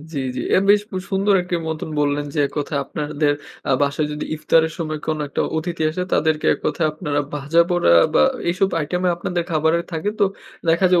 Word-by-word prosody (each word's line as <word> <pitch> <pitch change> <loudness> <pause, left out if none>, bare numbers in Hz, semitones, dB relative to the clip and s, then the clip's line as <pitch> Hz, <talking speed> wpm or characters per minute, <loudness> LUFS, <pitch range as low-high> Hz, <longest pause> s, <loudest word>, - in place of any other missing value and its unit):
জি, 145 - -3 0.2
জি। - - -2
এ - - +6
বেশ 205 0 +6
খুব 185 - -3
সুন্দর 195 +1 +2
একটি 180 0 -4
মতন 160 0 -4
বললেন 145 0 0
যে, - - -2
এক - - -12
কথায় 145 -1 -1
আপনাদের 150 +1 -1 0.4
আ - - +2
বাসায় 145 +2 +1
যদি 150 - -4
ইফতারের 160 +1 +2
সময় 155 -2 -3
কোন 155 -1 -1
একটা - - -3 0.2
অতিথি 170 +1 -3
আসে, 180 +3 -3
তাদেরকে 155 0 +1
এক - - -9
কথায় 155 +1 +1
আপনারা 150 -3 -2
ভাজাপোড়া 170 - +2 0.2
বা - - +6 0.3
এসব 190 +2 +1
আইটেমে 180 +4 -1
আপনাদের 175 0 -2
খাবারের 160 +1 +1
থাকে। 160 +5 -2
তো 205 - +6 0.4
দেখা 170 +3 +4
যায় 180 -1 +5
160 Hz, 195 wpm, -21 LUFS, 150-175 Hz, 0.4 s, এ